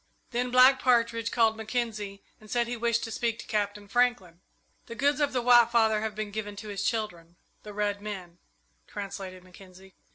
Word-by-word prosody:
Then 245 +1 -1
Black 255 +2 +6
Partridge 230 -2 +2
called 225 -2 +3
Mackenzie 220 -3 -4 0.2
and 215 - -16
said 240 +1 +1
he 240 +1 -4
wished 235 0 0
to 225 - -5
speak 230 0 -1
to - - -9
Captain 205 -1 -2
Franklin. 200 -7 0 0.5
"The 230 - -7
goods 285 +4 +1
of 290 -1 +1
the 250 -2 -1
White 240 -1 +6
Father 220 -2 +3
have 220 -1 -3
been 215 -1 -4
given 205 -1 -5
to 210 +1 -8
his 200 -1 -3
children, 175 -7 -3 0.3
the 210 - -10
red 205 0 -2
men," 185 -5 -7 0.5
translated 190 -2 -7
Mackenzie. 185 +1 -16
215 Hz, 185 wpm, -28 LUFS, 200-235 Hz, 0.5 s, Black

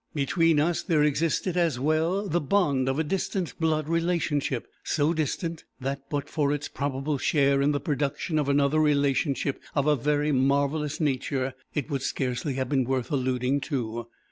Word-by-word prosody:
Between 160 +2 +2
us 165 +3 +1
there 155 -5 +2
existed, 165 +4 +1
as 165 -8 +1
well, 160 +8 +1
the 175 0 0
bond 140 -5 +2
of 135 - 0
a 160 - +2
distant 185 +1 -2
blood 155 -2 +1
relationship; 165 -6 0 0.2
so 155 +1 +1
distant, 160 +1 -2 0.2
that 135 +1 -4
but 145 -1 -2
for 145 -3 0
its 145 0 -2
probable 140 +1 -2
share 140 -2 +3
in 140 +1 +3
the 145 - 0
production 150 +2 -1
of 145 -2 0
another 140 +2 +3
relationship 140 -2 +1
of 140 -2 +2
a 150 -1 +4
very 150 +3 +1
marvellous 140 +3 +1
nature, 135 -3 -1 0.2
it 150 +1 -2
would 135 -2 -1
scarcely 130 +1 -2
have 130 -1 -1
been 135 -1 +2
worth 130 +2 -2
alluding 130 0 0
to. 120 -5 -3
145 Hz, 170 wpm, -27 LUFS, 135-155 Hz, 0.2 s, a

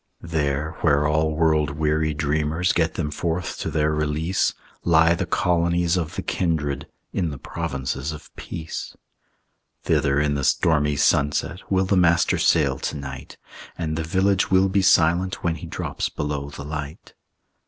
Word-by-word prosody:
There 75 -2 -1
where 75 -2 +3
all 80 +1 +1
world 80 -1 +2
weary 80 0 +1
dreamers 75 +3 0
Get 80 -2 0
them 75 -3 -2
forth 85 +3 -3
to - - -2
their 75 0 +1
release, 75 +4 0 0.3
Lie 80 0 +5
the 85 - -2
colonies 85 0 +1
of 85 -4 -2
the - - -3
kindred, 80 -6 -1 0.3
In 85 -4 0
the 70 - -6
provinces 65 +2 -4
of 75 - -11
peace. 80 -1 -7 0.9
Thither 70 0 +2
in 75 -1 +1
the 70 -1 -2
stormy 75 +1 +2
sunset 75 +7 +1
Will 95 0 +3
the 95 +1 +2
Master 85 -1 +3
sail - - +3
to - - -3
night; 65 -2 -8 0.4
And 80 -2 -2
the 80 - -2
village 95 +3 +1
will 95 +1 +4
be 100 +1 +2
silent 90 +1 +3
When 85 -2 +1
he 80 - -8
drops - - -3
below 70 -1 -3
the 70 0 -8
light. 75 -1 -7
80 Hz, 155 wpm, -23 LUFS, 75-85 Hz, 0.9 s, Lie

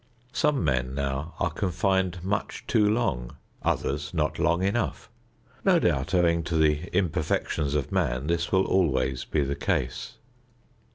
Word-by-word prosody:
Some 150 - +2
men 65 -3 0
now 70 +3 -3
are 85 - +1
confined 95 +1 0
much 100 +2 -2
too 105 -2 +3
long; 80 - -1 0.2
others - - -1
not - - 0
long 85 +2 +2
enough. 110 +2 -1 0.5
No 190 -3 +5
doubt, 75 - +1
owing 85 -1 +3
to 85 0 -2
the 75 +2 +2
imperfections 80 -4 0
of 75 -1 -1
man, 70 -9 0
this 85 +1 -1
will 95 0 +3
always 65 -8 +1
be 75 - 0
the 70 +1 -2
case. 60 -2 -2
85 Hz, 145 wpm, -27 LUFS, 70-95 Hz, 0.5 s, No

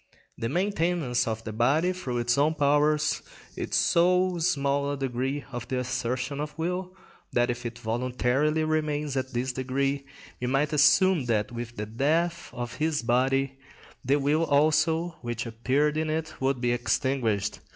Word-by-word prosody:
The 115 - -3
maintenance 170 - 0
of 110 0 -3
the 110 - -6
body 145 +11 +2
through 130 -9 -4
its 120 0 +1
own 150 +3 +2
powers 150 +1 +2 0.3
is - - -3
so 180 +1 +3
small 140 -4 +1
a 145 - -3
degree 135 +2 -2
of 120 -1 -5
the 130 - -2
assertion 125 +2 -2
of 150 0 -5
will, 180 +3 -3 0.4
that 120 0 +2
if 120 0 -4
it 115 0 -8
voluntarily 125 +6 0
remains 150 -2 -1
at 130 0 -2
this 125 +2 -1
degree, 135 +2 -1 0.3
we 125 - -2
might 140 +4 +1
assume 160 +1 +4
that, 110 -3 0
with 120 0 -6
the 105 - -3
death 160 +10 0
of 120 +2 -6
this 155 -3 0
body, 135 +3 +1 0.4
the 135 +3 +3
will 145 +3 +2
also 160 +3 +2
which 120 -1 -4
appeared 130 +7 0
in 155 0 0
it 155 0 -2
would 135 -1 +1
be 120 -1 +2
extinguished. 120 -4 0
140 Hz, 160 wpm, -27 LUFS, 120-155 Hz, 0.4 s, assume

